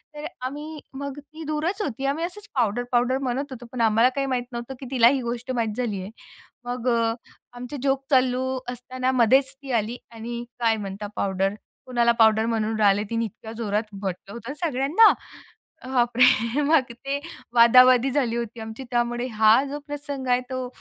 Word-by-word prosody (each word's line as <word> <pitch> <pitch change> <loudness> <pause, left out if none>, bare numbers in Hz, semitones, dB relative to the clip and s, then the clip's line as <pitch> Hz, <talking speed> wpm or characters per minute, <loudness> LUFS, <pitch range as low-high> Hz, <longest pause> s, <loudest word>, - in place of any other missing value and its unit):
तर 295 0 -7 0.2
आम्ही 295 +3 -6
मग 280 +1 -6
ती 310 +2 -11
दूरच 320 +7 -1
होती. 270 - -3
आम्ही 285 +4 0
असंच 400 +4 -9
पावडर-पावडर 245 +2 +1
म्हणत 270 +3 -2
होतो. 245 -2 -8
पण 250 - -3
आम्हाला 225 +2 +4
काही 275 -1 0
माहीत 255 -2 0
नव्हतं, 240 +2 -6
की 270 - -8
तिला 235 -3 +6
ही 265 0 +3
गोष्ट 240 +2 -4
माहीत 230 -4 -1
झाली 220 -6 -2
आहे. 190 +3 -8 0.5
मग 245 0 -4
अ, 230 -1 +2 0.4
आमचे 250 +4 -6
जोक 270 0 +1
चालू 260 0 +2
असताना 255 +1 -3
मधेच 265 +4 +4
ती 270 -2 -7
आली 230 +4 -6
आणि 235 +1 -6 0.2
"काय 230 -1 +3
म्हणता 205 0 -5
पावडर, 195 0 0 0.3
कुणाला 240 -2 +2
पावडर 220 0 +5
म्हणून 220 -1 -1
राहले?" 205 -1 +4
तिने 230 0 0
इतक्या 220 +1 -9
जोरात 210 0 -2
म्हटलं 195 +1 -5
होतं 235 +4 -7
सगळ्यांना. 300 - +5 0.7
अ, - - -10
बाप 240 -2 +1
रे! 250 +1 +4
मग 285 -4 +3
ते 275 +4 -4 0.4
वादावादी 250 +2 +7
झाली 250 -5 0
होती 235 0 -5
आमची 220 +4 -7
त्यामुळे 240 0 0
हा 220 +4 +6
जो 290 +1 -4
प्रसंग 285 -2 -5
आहे 245 0 +3
तो 255 -1 -3
245 Hz, 175 wpm, -24 LUFS, 230-270 Hz, 0.7 s, वादावादी